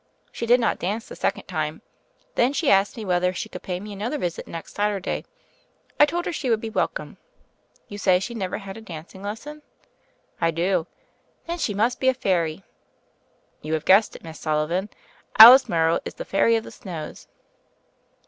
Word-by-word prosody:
She 235 - -5
did 245 +2 +5
not 230 - 0
dance 210 +6 -3
the - - -9
second - - -1
time. - - -4 0.5
Then 245 +3 +2
she 290 0 +1
asked 195 +4 +3
me 220 - -6
whether 180 -1 +1
she - - -5
could - - -8
pay 180 -1 -4
me 210 +2 -8
another 220 +9 -3
visit 175 - -4
next 165 -1 -8
Saturday. 205 -2 -2 0.7
I 295 - +7
told 345 +4 -2
her - - -3
she 270 -5 -3
would 225 -2 +2
be 225 0 -6
welcome. - - -2 0.7
You 205 - -8
say 185 -2 +3
she 235 +5 -5
never 195 -5 -3
had 195 -1 -9
a - - -10
dancing 180 -1 -10
lesson?" 230 +10 -7 0.8
"I 165 - +3
do." 170 +1 0 0.6
"Then 340 +1 -4
she 210 -10 -1
must 230 +4 +1
be 260 - +3
a 260 - +1
fairy." 180 -6 -1 1.0
"You 155 +1 -2
have 155 - -4
guessed 200 +3 +5
it. - - -12
Miss 160 -1 -10
Sullivan: 160 +6 -1 0.5
Alice 245 +5 +11
Morrow 165 -1 +2
is - - -7
the - - -7
Fairy 230 +4 +3
of 225 - -1
the - - -10
Snows." 170 -7 -8
200 Hz, 185 wpm, -24 LUFS, 175-230 Hz, 1.0 s, Alice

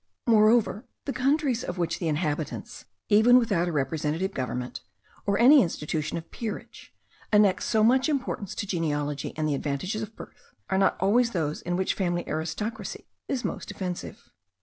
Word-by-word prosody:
Moreover, 220 -1 +4 0.2
the 275 - -2
countries 270 -2 +1
of 180 - -5
which 165 -1 -1
the 170 - -2
inhabitants, 150 -1 -3 0.2
even 225 +4 +7
without 195 -8 +2
a - - -1
representative 155 +6 -1
government, 125 -1 -4 0.5
or 200 0 +2
any 270 +4 +8
institution 155 -4 -2
of 165 - -9
peerage, 225 -3 -7 0.4
annex 210 -3 +4
so 215 -1 +2
much 260 +5 +4
importance 260 -9 -2
to - - -3
genealogy 150 -6 -2
and 155 -1 0
the 150 - +1
advantages 150 +10 -2
of 220 +1 -7
birth, - - -13 0.2
are 190 - +2
not 195 - +3
always 235 +5 +3
those 155 -4 -1
in 175 0 -2
which 190 +1 0
family 175 -2 -1
aristocracy 175 +10 -4 0.2
is 265 -3 -2
most - - -4
offensive. 185 -3 -6
190 Hz, 160 wpm, -27 LUFS, 160-225 Hz, 0.5 s, any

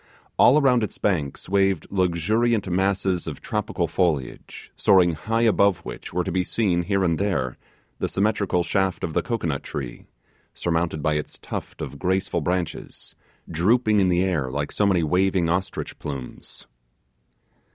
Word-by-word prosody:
All 140 +5 +7
around 130 -4 +4
its 105 - -4
banks 80 -9 -1
waved 95 -2 +2
luxuriant 100 +5 +1
masses 95 -1 0
of 75 -4 -5
tropical 105 -5 -2
foliage, 80 -6 -2
soaring 90 -3 +4
high 115 +9 -1
above 100 -4 +4
which - - -7
were 90 +1 -1 0.2
seen, 90 -4 +1
here 95 +2 0
and 85 -3 +1
there, 90 -11 -1 0.4
the - - -1
symmetrical 100 -3 +1
shaft 95 0 0
of 80 - -2
the - - +2
cocoanut 85 - -2
tree, 65 -4 -7 0.5
surmounted 85 -3 -1
by 75 - +2
its 75 - -5
tufts - - -6
of 70 - -7
graceful 95 -2 0
branches, 90 +1 -3 0.3
drooping 105 +6 +2
in 95 -2 +3
the 90 0 +2
air 80 -9 0
like 70 +2 -3
so 105 - +1
many 90 -4 +2
waving 90 +2 +2
ostrich 95 +2 -3
plumes. 70 -4 -8
90 Hz, 145 wpm, -24 LUFS, 85-100 Hz, 0.5 s, All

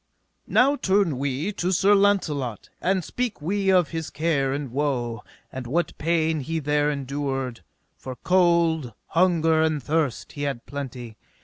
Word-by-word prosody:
Now 280 +3 +4
turn 190 - +1
we 140 +7 -1
to 185 -3 -2
Sir 195 +3 +4
Launcelot, 160 - +1
and 190 0 +1
speak 245 +3 -3
we 195 +5 0
of 180 -5 +4
his 160 -2 -4
care 150 -4 0
and 140 -2 -3
woe, 125 -4 -1 0.3
and 130 -2 -6
what 170 +7 -1
pain 160 0 +1
he 160 +4 -3
there 150 -1 +1
endured; 135 -3 -3 0.4
for 130 -1 -7
cold, 170 -4 +2 0.2
hunger, 165 -2 +3
and 155 -3 0
thirst, 150 -6 -1
he 145 - -8
had 140 -4 -3
plenty. 125 -5 -7
155 Hz, 145 wpm, -24 LUFS, 135-175 Hz, 0.4 s, Now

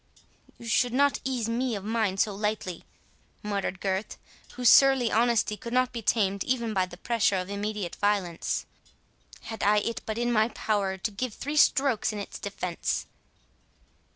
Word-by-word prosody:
"You 235 - -12
should 240 +1 +2
not 280 +2 +3
ease 250 -4 -1
me 240 +1 -1
of 200 - -6
mine 215 -3 0
so 205 +1 +1
lightly," 205 -4 -3 0.6
muttered 200 -3 -2
Gurth, 195 +2 -2 0.4
whose 250 -1 0
surly 265 -2 +6
honesty 230 -2 +2
could 235 +4 -8
not 255 0 +2
be 235 - -5
tamed 200 -2 +1
even 235 -3 -1
by 185 -2 +1
the 175 -1 -12
pressure 225 0 +1
of 185 +1 -4
immediate 205 -3 -3
violence,—"had 205 +3 -4
I 210 +1 +4
it 230 +2 -1
but 220 0 -3
in 240 0 0
my 220 0 +4
power 200 -5 -1
to 200 +3 -3
give 220 +2 -4
three 290 +2 -4
strokes 270 -7 +3
in 210 - -6
its 200 - -6
defence." 185 -4 -3
215 Hz, 160 wpm, -27 LUFS, 200-235 Hz, 0.6 s, surly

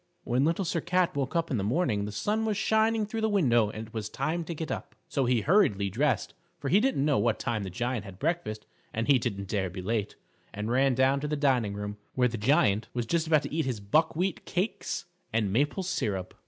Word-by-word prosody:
When 125 +4 +1
Little 170 +4 +1
Sir 165 0 -1
Cat 180 0 +1
woke 140 +2 -2
up 165 -1 0
in 125 - +1
the 100 - -1
morning 110 - +1
the 105 - -5
sun 210 - -1
was 215 -2 0
shining 220 0 +2
through 225 +2 -4
the 220 - +2
window 120 - +3
and 110 +1 -6
it - - -23
was 110 -2 -3
time 155 +5 -2
to 170 - -5
get 160 0 -4
up. - - -5
So 135 -3 0
he 120 -2 +2
hurriedly 100 - +3
dressed, 130 +4 0 0.2
for 140 -5 -4
he 190 - +5
didn't 230 - +1
know 145 -2 +3
what 115 -2 +2
time 115 -3 -2
the 95 - -4
Giant 120 +3 -2
had 95 -3 -10
breakfast 155 - -2 0.3
and 115 +1 -1
he 140 -3 +5
didn't 100 -5 -3
dare 95 -2 -1
be 90 +1 -7
late, 105 0 -1 0.4
and 105 +2 -3
ran 135 +1 +3
down 130 +2 +3
to 150 - -3
the 150 - -1
dining 125 -8 +2
room, 105 0 -5 0.2
where 125 -1 +4
the 115 -2 -4
Giant 110 -4 +3
was 120 -1 -1
just 165 +6 0
about 155 -2 +4
to - - -6
eat 160 0 0
his 125 -5 -2
buckwheat 160 - +1
cakes 185 +5 -2 0.3
and 105 -4 0
maple 145 - +1
syrup. 105 - -2
130 Hz, 235 wpm, -28 LUFS, 110-165 Hz, 0.4 s, he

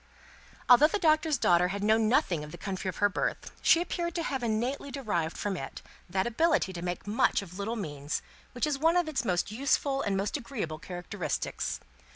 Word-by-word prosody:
Although 250 +5 +8
the 415 - -1
Doctor's 310 -4 +3
daughter 175 -5 +4
had 200 +2 -3
known 220 +1 +3
nothing 190 - +2
of 150 - -9
the - - -8
country 190 -1 -3
of 185 - -5
her 205 - +4
birth, 205 - -2
she 335 - +5
appeared 345 -1 -3
to 335 - -1
have 270 -5 -2
innately 240 +5 -1
derived 210 - -2
from 205 -2 -2
it 135 -6 -7 0.3
that 190 +1 0
ability 240 - +2
to 170 - -6
make 175 +1 -4
much 205 -1 +2
of 180 0 -11
little 220 +4 -2
means, 145 -8 -4 0.3
which 245 +4 0
is 295 -2 -1
one 325 +4 +4
of 350 -2 +2
its 275 -6 -1
most 180 -2 0
useful 275 +3 +1
and 195 -1 0
most 200 +8 -1
agreeable 220 - -5
characteristics. 175 -2 -3
220 Hz, 200 wpm, -29 LUFS, 185-280 Hz, 0.3 s, Although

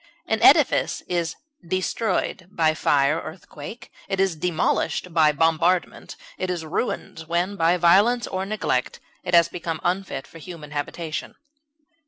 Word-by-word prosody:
An - - -1
edifice - - +4
is 170 -2 -1 0.3
destroyed 185 +1 -2
by 160 -5 +2
fire 145 -1 +2
or 155 - -7
earthquake; 170 +5 -11 0.2
it 195 -1 -2
is 190 -3 +2
demolished 175 +1 -1
by 155 -2 +5
bombardment; 165 +4 +1 0.2
it 185 - -2
is 175 -3 -3
ruined 165 +1 -3
when, 175 +4 0
by 170 -1 +3
violence 200 +8 +4
or 190 0 -3
neglect, 195 -11 -2 0.2
it 180 - +1
has 170 -1 +6
become 170 -2 -5
unfit 180 -6 -2
for 165 - -14
human 155 -3 -10
habitation. 155 +2 -4
170 Hz, 140 wpm, -23 LUFS, 160-185 Hz, 0.3 s, has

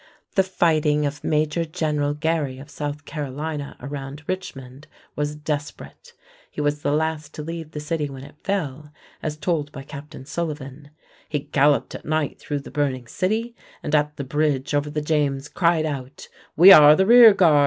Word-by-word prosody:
The 195 - +4
fighting 155 -5 +1
of 145 0 -4
Major 155 +2 +1
General 150 -2 -1
Gary 150 -4 -1
of 140 +3 -12
South 145 -1 -5
Carolina 145 0 -5
around 140 +1 -7
Richmond 135 -7 -6 0.3
was 150 0 -2
desperate. 150 - -6 0.4
He - - -9
was 145 0 0
the 145 - 0
last 155 -1 -2
to 150 - -6
leave 165 0 -6
the 150 - -7
city 150 -1 -2
when 135 -1 -9
it 145 - -14
fell, 150 -7 -3 0.3
as 150 -1 -4
told 155 -3 -1
by 135 - -8
Captain 140 -1 -10
Sullivan: 145 -3 -5 0.4
"He 150 -2 -1
galloped 145 0 +2
at - - -8
night 155 -2 -1
through 145 -1 -4
the - - -11
burning 135 -4 -1
city, 220 - -2 0.3
and 150 - -4
at 150 0 +1
the 140 - -3
bridge 145 0 -1
over 145 0 0
the 150 +1 -2
James 145 -2 0
cried 170 -2 +1
out, 135 -3 -6 0.3
'We 180 +5 +10
are 150 -4 +9
the 190 - +3
rear 235 +1 +9
guard. 165 -7 +5
150 Hz, 175 wpm, -23 LUFS, 145-160 Hz, 0.4 s, We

